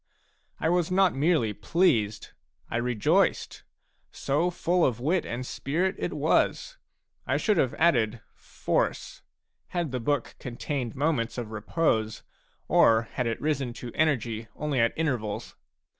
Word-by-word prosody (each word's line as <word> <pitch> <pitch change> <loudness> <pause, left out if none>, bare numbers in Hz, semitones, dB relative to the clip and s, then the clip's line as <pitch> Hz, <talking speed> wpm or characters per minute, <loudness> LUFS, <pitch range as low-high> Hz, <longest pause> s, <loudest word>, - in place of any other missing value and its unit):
I - - 0
was 175 -1 +2
not 185 -1 +3
merely 140 -6 +2
pleased; 110 - +1 0.4
I - - 0
rejoiced. 120 -3 +1 0.5
So 150 +6 0
full 175 0 +1
of 120 -3 +1
wit 165 +8 0
and 125 +2 -4
spirit 170 +10 -1
it - - -2
was! - - +1 0.5
I - - +2
should 210 -4 +1
have 130 -6 +1
added 120 -9 +2
" - - -41 0.3
force," - - -1 0.5
had 170 -5 -2
the 130 - -2
book 140 +1 -1
contained 125 0 -4
moments 130 -5 0
of 115 -3 -5
repose, 110 -1 -1 0.4
or 115 0 +4
had 125 - -2
it 115 - -2
risen 140 -5 -1
to 120 0 -8
energy 120 -8 0
only 150 -4 -1
at 115 0 +3
intervals. 125 -10 -2
130 Hz, 140 wpm, -27 LUFS, 115-160 Hz, 0.5 s, or